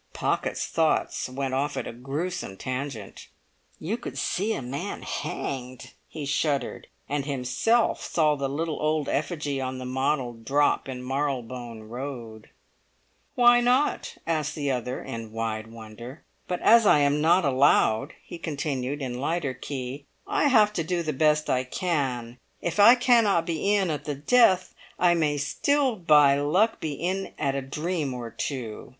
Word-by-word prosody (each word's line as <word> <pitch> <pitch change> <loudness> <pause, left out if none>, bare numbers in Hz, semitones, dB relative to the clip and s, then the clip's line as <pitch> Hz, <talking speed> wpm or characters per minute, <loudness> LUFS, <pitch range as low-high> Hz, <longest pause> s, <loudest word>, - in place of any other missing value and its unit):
Pocket's - - -1
thoughts - - 0
went 135 0 -3
off 140 +2 -1
at - - -2
a - - -6
gruesome 135 - -4
tangent. 130 -4 -5 0.5
"You 200 +9 -2
could 245 - -7
see 205 +5 -1
a - - -3
man 130 +3 -5
hanged!" 130 -2 -5
he 155 -3 -6
shuddered, 140 0 -1 0.2
and 145 0 -2
himself 140 - +1
saw 155 -3 +2
the 140 -1 -2
little 155 +3 -3
old 155 -1 0
effigy 145 -2 -2
on 130 0 -3
the 130 - -6
model 130 0 -1
drop 135 +5 +1
in 125 -1 -6
Marylebone 125 -4 -3
Road. 115 -2 -7 0.9
"Why 240 0 +6
not?" 250 +4 +1
asked 155 -2 -1
the 145 -3 -1
other 125 0 -3
in 115 -1 -7
wide 110 -1 -3
wonder. 115 +4 -10 0.2
"But 180 - -3
as 230 -1 +6
I 150 - +6
am 145 +1 +2
not 170 +2 +4
allowed," 135 -1 +3
he 170 - -9
continued 145 -3 -3
in 125 -1 -4
lighter 150 -2 -1
key, 135 +1 -6 0.2
"I 400 -6 +1
have 215 -6 +5
to 170 - -1
do 170 +1 -1
the 155 -1 -2
best 150 +2 +2
I 130 0 +1
can. 130 -6 -2 0.2
If 175 +3 -3
I 230 +5 +9
cannot 230 -8 +3
be 175 +5 +1
in 190 -5 +1
at 150 -1 -4
the 145 -1 -2
death, 185 - +3 0.2
I 175 -1 +4
may 155 -3 +1
still 265 - +1
by 150 -6 +5
luck 185 +11 +2
be 155 -2 -3
in 185 +6 -3
at 140 -2 0
a 140 - -2
dream 150 +1 -3
or 120 -2 -6
two! 120 -6 -5
145 Hz, 160 wpm, -26 LUFS, 130-170 Hz, 0.9 s, I